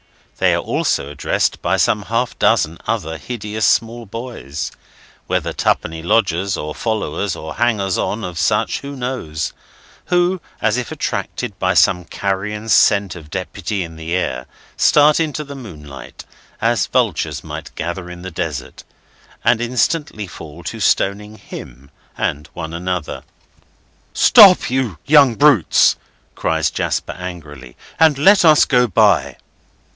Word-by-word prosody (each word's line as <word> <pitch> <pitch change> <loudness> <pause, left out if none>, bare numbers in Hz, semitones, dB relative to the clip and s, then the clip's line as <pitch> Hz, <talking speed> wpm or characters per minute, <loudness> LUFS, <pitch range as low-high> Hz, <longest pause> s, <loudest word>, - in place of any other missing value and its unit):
They - - +3
are - - -1
also 70 - -1
addressed 75 - -1
by - - +1
some 105 - +2
half 115 +3 -2
dozen 80 +2 +2
other 80 0 -2
hideous 105 - -2
small 115 0 0
boys—whether 110 - -6
twopenny 80 0 -1
lodgers 95 -1 +1
or 75 0 -5
followers 100 -4 -2
or 80 0 -7
hangers 105 -6 +1
on 110 +2 -2
of 90 -2 -5
such, - - +1
who 140 0 -8
knows!—who, 130 - -3 0.2
as 105 +2 +1
if 125 - -4
attracted - - -4
by - - +1
some 90 -1 +3
carrion 100 +4 -3
scent 100 -3 +4
of 80 -3 -11
Deputy 95 +2 -4
in 80 -1 -9
the 80 +2 -4
air, 90 - -2 0.3
start 150 +1 +4
into 155 -2 -2
the 140 -1 -9
moonlight, 75 - -11 0.3
as - - +1
vultures - - 0
might - - -7
gather 85 +1 -4
in 90 0 -10
the 95 - -6
desert, 80 -6 -5 0.6
and 120 - +3
instantly 125 -1 -1
fall 85 -2 -11
to 115 - -6
stoning 105 +1 0
him 70 - -11 0.3
and 75 +3 -2
one 80 -1 -6
another. 90 -1 -4 0.9
"Stop, 195 - +7
you 125 -9 -1
young 140 -5 +5
brutes," 140 - +4 0.4
cries - - 0
Jasper - - -2
angrily, 75 -9 -9 0.2
"and 160 -3 +5
let 190 +8 +5
us 155 -3 +6
go 125 -1 +3
by!" 100 - +2
100 Hz, 135 wpm, -18 LUFS, 85-125 Hz, 0.9 s, Stop